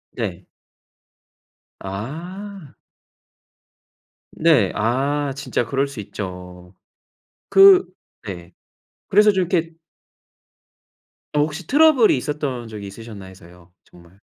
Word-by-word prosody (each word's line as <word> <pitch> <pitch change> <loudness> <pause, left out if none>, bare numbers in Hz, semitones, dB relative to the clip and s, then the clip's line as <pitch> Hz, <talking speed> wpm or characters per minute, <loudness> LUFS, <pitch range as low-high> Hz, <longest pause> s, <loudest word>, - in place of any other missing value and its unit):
네. - - -5 1.3
아. 165 - -8 1.6
네. 155 - +3
아 140 +6 0
진짜 140 -3 -2
그럴 135 +4 -1
수 135 -5 -9
있죠. 90 -2 -8 0.8
그 390 -1 +7 0.4
네. 90 -4 -9 0.6
그래서 210 +1 +5
좀 190 -1 +1
이렇게 165 -3 -1 1.6
어 - - +3
혹시 150 +3 -2
트러블이 290 - +5
있었던 135 -4 -4
적이 105 -2 -8
있으셨나 105 -1 -10
해서요. 90 -1 -16
정말. 90 +2 -20
135 Hz, 170 characters per minute, -21 LUFS, -, 1.6 s, 그